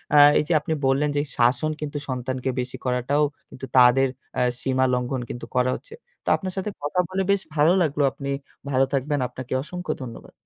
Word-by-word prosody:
আ 145 - +8 0.2
এইযে 150 +3 0
আপনি 160 - -2
বললেন 140 +3 +2
যে - - +3 0.2
শাসন 125 +6 +3
কিন্তু 145 -1 -3
সন্তানকে 130 +1 -2
বেশি 125 0 -4
করাটাও 125 +4 +1 0.3
কিন্তু 135 - -8
তাদের 125 +2 +6 0.3
অ্যা - - +2 0.2
সীমা 130 0 +2
লঙ্ঘন 125 +1 -1
কিন্তু 120 - -6
করা 125 0 +3
হচ্ছে। 440 - -11 0.3
তো - - -2
আপনার 185 -2 -5
সাথে 190 +2 -1
কথা 145 +5 -1
বলে 190 +1 -1
বেশ 200 -1 +2
ভালো 150 +3 +5
লাগলো। 145 -3 +1
আপনি 140 0 -6 0.4
ভালো 135 0 +3
থাকবেন। 145 +1 0
আপনাকে 125 +1 -7
অসংখ্য 180 +4 -5
ধন্যবাদ। 120 -3 -9
135 Hz, 185 wpm, -24 LUFS, 125-150 Hz, 0.4 s, আ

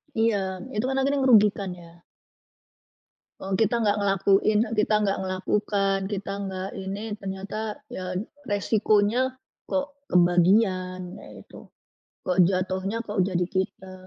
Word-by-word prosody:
Iya, 225 -1 +3 0.4
itu 215 +4 0
kan 265 - -1
akhirnya 280 +1 +1
ngerugikan 210 -6 +4
ya. 170 -1 -15 1.4
E - - -7 0.2
kita 225 +2 +3
nggak 210 0 +2
ngelakuin, 200 +2 +3 0.2
kita 215 0 +3
nggak 195 -1 0
melakukan, 195 +1 0 0.2
kita 195 0 -4
nggak 190 0 -4 0.2
ini, 200 +3 -4 0.2
ternyata 195 +2 -5 0.3
ya 185 0 -5 0.3
resikonya 215 +5 +2 0.3
kok 285 0 -1 0.2
kebagian 185 +1 +3 0.2
ya - - -12
itu, - - -14 0.7
kok 185 0 -1
jatuhnya 190 +3 -1
kok 205 -2 -2
jadi 180 -1 +1
kita. 190 0 -3
195 Hz, 120 wpm, -25 LUFS, 185-215 Hz, 1.4 s, ngerugikan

